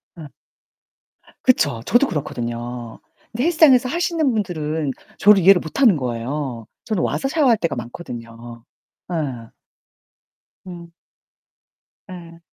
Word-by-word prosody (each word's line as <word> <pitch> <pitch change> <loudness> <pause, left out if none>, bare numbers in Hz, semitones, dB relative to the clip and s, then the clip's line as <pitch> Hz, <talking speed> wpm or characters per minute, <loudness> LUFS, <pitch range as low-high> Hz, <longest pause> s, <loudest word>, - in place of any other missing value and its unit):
어. 160 -4 -10 1.2
그쵸. 145 - +2
저도 240 - +3
그렇거든요. 120 -5 -5 0.3
근데 240 +4 -2
헬스장에서 295 -7 +5
하시는 335 -2 0
분들은 160 -8 -2 0.3
저를 205 -1 +5
이해를 185 +1 +6
못 160 - -6
하는 225 - +5
거예요. 125 -1 -4 0.2
저는 215 -6 -1
와서 270 - -1
샤워할 270 -5 +3
때가 170 -5 -2
많거든요. 120 -2 -9 0.5
예. 135 -9 -4 1.2
음. 170 -2 -10 1.2
예. 170 -2 -11
165 Hz, 240 characters per minute, -20 LUFS, -, 1.2 s, 이해를